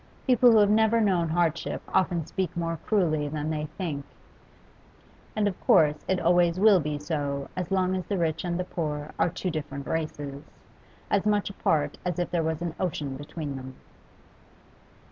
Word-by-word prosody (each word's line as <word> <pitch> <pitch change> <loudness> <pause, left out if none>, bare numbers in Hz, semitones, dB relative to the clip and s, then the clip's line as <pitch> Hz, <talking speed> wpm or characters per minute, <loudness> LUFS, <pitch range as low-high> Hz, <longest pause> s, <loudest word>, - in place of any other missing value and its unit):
People 250 -2 +6
who - - +6
have 205 -1 +5
never 220 +1 +4
known 185 -6 +2
hardship 165 -1 0
often 170 -4 +2
speak 180 -1 -3
more 165 -1 -2
cruelly 155 -8 +2
than 150 +1 -3
they 155 -1 -2
think, 155 -7 -3 1.3
and 210 -1 +2
of 190 - -4
course 155 - +4
it 190 -1 +1
always 175 +1 +3
will 205 -2 +6
be 150 -1 -2
so 145 -2 -3
as 180 -2 -3
long 185 -1 +1
as 185 - -4
the 200 - -1
rich 165 -3 0
and 175 -1 -2
the - - 0
poor 150 -4 -4
are - - +3
two 180 +1 -3
different 145 -3 -5
races, 145 -3 -4 0.7
as 200 +1 +2
much 205 -1 +1
apart 150 -6 0
as 180 -2 -2
if 175 - -2
there 175 -1 +1
was 160 +1 -2
an 170 -2 -3
ocean 150 -7 -2
between 145 +1 -6
them. 130 0 -8
170 Hz, 175 wpm, -27 LUFS, 150-185 Hz, 1.3 s, People